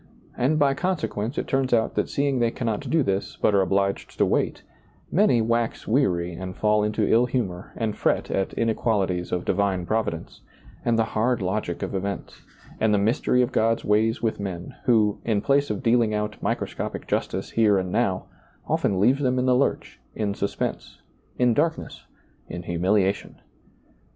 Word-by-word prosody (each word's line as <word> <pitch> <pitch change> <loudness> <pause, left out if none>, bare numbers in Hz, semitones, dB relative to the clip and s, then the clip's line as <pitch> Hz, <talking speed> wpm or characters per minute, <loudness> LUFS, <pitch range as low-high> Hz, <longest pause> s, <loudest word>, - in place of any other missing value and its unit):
And 140 +5 +1
by 140 -2 +3
consequence 140 - -2
it - - -1
turns 135 -2 +1
out 110 -1 0
that - - -1
seeing 140 -2 0
they 120 -1 +3
cannot 115 -3 -3
do 160 -2 +3
this, 95 -3 -2
but 105 - +2
are 100 - +4
obliged 100 +1 -1
to - - +4
wait, - - 0 0.5
many 155 - +3
wax 115 0 -1
weary 90 -9 +1
and 90 +1 -6
fall 105 0 +2
into 105 0 0
ill 120 +2 +4
humor 100 -8 -3
and 110 -2 -2
fret - - 0
at 95 - 0
inequalities 100 -6 0
of 90 -1 -2
divine 95 -2 0
Providence, 85 -5 -3 0.4
and 115 -1 +2
the 115 - +4
hard 120 +2 +1
logic 95 -2 -2
of - - -4
events, 100 -1 -4 0.4
and 110 -1 +3
the - - +3
mystery 120 +4 +2
of 120 - -2
God's 115 +1 +1
ways 110 +3 +2
with 110 -1 0
men, 90 -3 -5
who, 110 -4 +3
in 110 -3 +1
place 140 +6 +2
of - - -3
dealing 115 -2 +3
out 105 0 -3
microscoiHC - - -3
justice - - -2
here 105 -3 +3
and 95 -1 -2
now, 100 -4 0 0.4
often 95 - +1
leaves 125 +8 +3
them 130 -2 +1
in 125 - +1
the 130 -1 +4
lurch, 140 +2 -1 0.2
in 105 -2 -1
suspense, 100 0 -4 0.4
in 125 -1 +3
darkness, 160 +5 -2 0.4
in 90 - -6
humiliation. 95 +3 0
110 Hz, 170 wpm, -24 LUFS, 100-125 Hz, 0.5 s, are